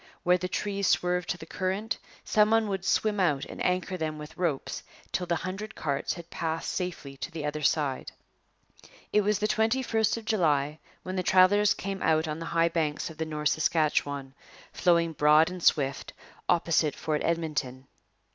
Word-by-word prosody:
Where 180 +1 +4
the 180 - -2
trees 200 0 -1
swerved 180 0 +1
to - - -1
the 160 - -10
current, 190 +6 -2 0.2
some 210 0 +3
one 225 -1 +3
would 190 -2 -2
swim 210 +1 +1
out 150 -7 +2
and - - -6
anchor 185 0 0
them 155 -2 -3
with 150 0 -9
ropes 165 -7 -2 0.3
till 180 - -2
the 170 - +1
hundred 190 +6 -5
carts 140 -2 -2
had 170 -1 -11
passed 160 0 -2
safely 175 -7 -4
to - - -5
the 160 -2 -5
other 150 +1 -3
side. 140 -2 0 1.0
It 210 - +5
was 210 0 +1
the 210 +1 0
21st 225 0 +1
of 225 - -8
July 155 -8 +1 0.2
when 185 +1 -4
the - - +1
travellers 200 +3 +5
came 195 0 -5
out 160 0 +2
on 155 +1 -3
the 165 - -5
high 165 0 +4
banks 160 -1 -1
of 160 - -15
the 160 - -1
North 150 -1 -1
Saskatchewan, 145 -4 0 0.4
flowing 170 -2 +2
broad 150 +3 +5
and 180 -1 -7
swift, 140 -4 +1 0.4
opposite 165 -3 +2
Fort 155 -1 -2
Edmonton. 150 -6 -2
170 Hz, 175 wpm, -28 LUFS, 155-190 Hz, 1.0 s, It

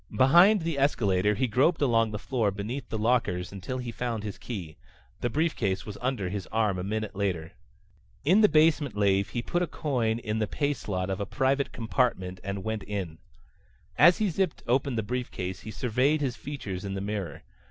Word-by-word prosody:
Behind 175 +9 +6
the 165 -4 -1
escalator 105 -7 +2
he 130 - +1
groped 130 +9 +2
along 115 -5 +3
the 105 - -4
floor 115 -1 0
beneath 110 +6 -5
the 110 - -2
lockers 105 -6 +1
until 100 +6 -5
he 125 -2 -4
found 115 -2 -3
his 105 -2 -6
key. 90 -10 -6 0.4
The 120 - -1
briefcase 120 - 0
was 105 - -7
under 125 -7 -1
his 95 0 -4
arm 105 -4 0
a - - -3
minute 110 +2 -3
later. 90 -5 -2 0.7
In 185 +8 +5
the 210 - +6
basement 155 -6 +3
lave 100 -1 +2
he 120 - -3
put 175 - -1
a 180 - +1
coin 120 -9 -1
in 110 -2 -3
the 110 - 0
pay 145 +6 0
slot 95 -7 -3
of 95 - -2
a 100 - -3
private 135 +2 +1
compartment 110 -6 -1
and 100 0 -4
went 110 -1 -2
in. 95 -7 -5 0.8
As 175 +4 +7
he 215 -2 +1
zipped 185 0 -1
open 130 +1 +1
the 110 - 0
briefcase 100 -6 -4
he - - -9
surveyed 130 +7 +1
his 135 -4 -1
features 105 -12 -6
in 100 -1 -4
the - - -2
mirror. 100 -6 -4
115 Hz, 195 wpm, -28 LUFS, 100-135 Hz, 0.8 s, As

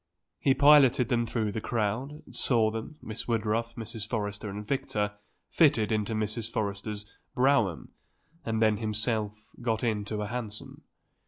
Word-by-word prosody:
He 135 -2 +3
piloted 140 -4 +6
them 120 -1 +1
through 110 -2 -1
the 110 - -3
crowd, 120 +8 -2
saw 115 -4 +3
them 115 +7 -6
Miss 110 0 -5
Woodruff, 115 0 0
Mrs. 110 -2 -6
Forrester 105 -2 -3
and 105 +1 -6
Victor, 105 -6 -1 0.4
fitted 120 -10 +3
into 110 0 0
Mrs. 110 +1 -2
Forrester's 105 -1 -3 0.3
brougham, 125 - +2 0.5
and 110 -1 0
then 110 -1 +3
himself 110 -1 -2
got 115 -2 -1
into 105 -2 -1
a - - -2
hansom. 110 -2 -6
110 Hz, 140 wpm, -29 LUFS, 105-120 Hz, 0.5 s, piloted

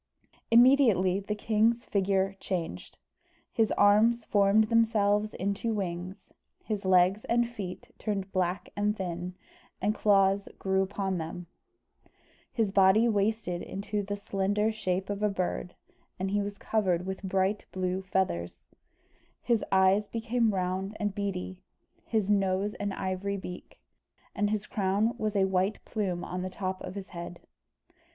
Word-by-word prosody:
Immediately 230 -7 +5
the 205 +1 -3
king's 225 +3 +1
figure 195 -1 +1
changed. 175 -4 -4 0.5
His 225 -3 +1
arms 220 +3 +4
formed 205 +1 +4
themselves 215 -2 +2
into 200 +4 -1
wings; 185 0 -5 0.3
his 210 -3 -3
legs 185 +2 +4
and 240 0 +2
feet 230 +1 -7
turned 195 -3 -3
black 185 0 -1
and 210 +1 0
thin, 180 -1 -4 0.4
and 205 +3 +1
claws 195 -2 +3
grew 190 0 +1
upon 190 -1 -2
them; 165 +2 -6 1.1
his 220 -4 0
body 195 +4 +5
wasted 205 -4 0
into 205 +2 -3
the 205 0 -3
slender 205 +2 0
shape 190 -3 -2
of 200 0 -4
a 210 - +3
bird, 180 -2 -3 0.4
and 190 +1 -2
was 205 0 -5
covered 185 -6 0
with 190 0 -4
bright 195 +1 0
blue 185 0 -2
feathers; 180 - -2 0.8
his 235 -3 +1
eyes 190 +2 +4
became 230 0 0
round 190 +2 -2
and 205 -2 -1
beady; 185 -2 -4 0.5
his 215 -3 +1
nose 195 0 +1
an 205 0 -2
ivory 195 +1 -2
beak; 180 -2 -9 0.5
and 205 0 0
his 210 -1 -1
crown 205 +3 0
was 215 -1 -1
a 195 -1 +4
white 190 +2 +1
plume 190 -6 -2
on 180 +1 -4
the 185 - -3
top 185 0 -4
of 180 - -7
his 195 -2 -7
head. 170 0 -7
195 Hz, 140 wpm, -29 LUFS, 185-210 Hz, 1.1 s, Immediately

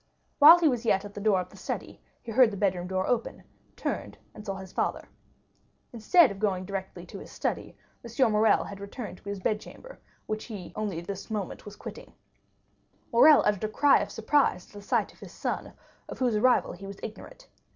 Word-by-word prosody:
While 315 +4 +10
he 340 -2 +3
was 245 -5 0
yet 205 -3 +1
at 205 - -10
the 205 - -7
door 205 -3 +3
of 180 - -9
the - - -16
study - - -6 0.2
he 230 - -7
heard 250 +1 +5
the 200 - -7
bedroom 185 -3 0
door 190 0 -1
open, 240 -2 -2 0.3
turned, - - -4 0.2
and 210 - -11
saw 195 -2 -4
his 190 -1 -10
father. - - -2 0.9
Instead 240 - +5
of 195 - -8
going 190 -3 -1
direct 195 0 -5
to 195 - -9
his - - -11
study, - - -4 0.3
M. 235 0 +1
Morrel 215 +1 +3
had 200 - -9
returned 200 -1 -8
to 200 - -9
his 200 -1 -4
bedchamber, 215 - -5 0.3
which 215 0 -4
he 210 -6 -7
was - - -12
only 205 -6 -3
this 195 +4 -7
moment 210 -4 -4
quitting. - - -10 1.0
Morrel 290 +6 +7
uttered 210 -1 +1
a 215 - -1
cry 285 +6 +4
of - - -3
surprise 275 -11 +1
at - - -22
the 205 - -10
sight 200 - -1
of - - -24
his - - -11
son, - - -4 0.4
of - - -7
whose 245 -4 +1
arrival 245 +4 +3
he 195 +2 -10
was 195 0 -9
ignorant. - - -9
210 Hz, 205 wpm, -28 LUFS, 195-235 Hz, 1.0 s, While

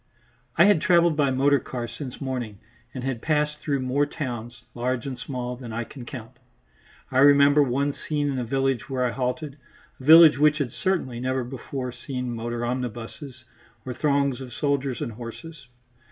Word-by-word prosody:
I - - +7
had 205 -6 +4
travelled 170 -2 +4
by 145 -2 +2
motor 140 +2 +3
car 120 -2 -5
since 130 0 -8
morning, 125 -6 -4 0.3
and 125 - -6
had 130 -3 -3
passed 150 -1 0
through 140 -3 -1
more 135 +3 +1
towns, 120 -6 -6
large 125 0 -2
and 130 -3 -5
small, 125 -1 -4
than 120 -2 -9
I 115 +2 -2
can 125 +1 -10
count. 120 -6 -9 0.7
I 130 - +2
remember 140 +1 +6
one 140 +2 +1
scene 145 0 -2
in 130 - -2
a - - -1
village 135 +1 -1
where 130 -2 0
I 120 - 0
halted, 135 +4 -3 0.4
a - - -11
village 160 0 +8
which 150 0 +4
had 140 -6 -2
certainly 170 -11 -1
never 130 +1 -1
before 125 +1 -5
seen 125 -1 -5
motor 120 +1 -3
omnibuses 125 +2 -5 0.4
or 130 - -4
throngs 140 -2 +1
of 125 -2 -8
soldiers 140 -1 -1
and - - -3
horses. 130 +7 -10
130 Hz, 175 wpm, -25 LUFS, 125-145 Hz, 0.7 s, village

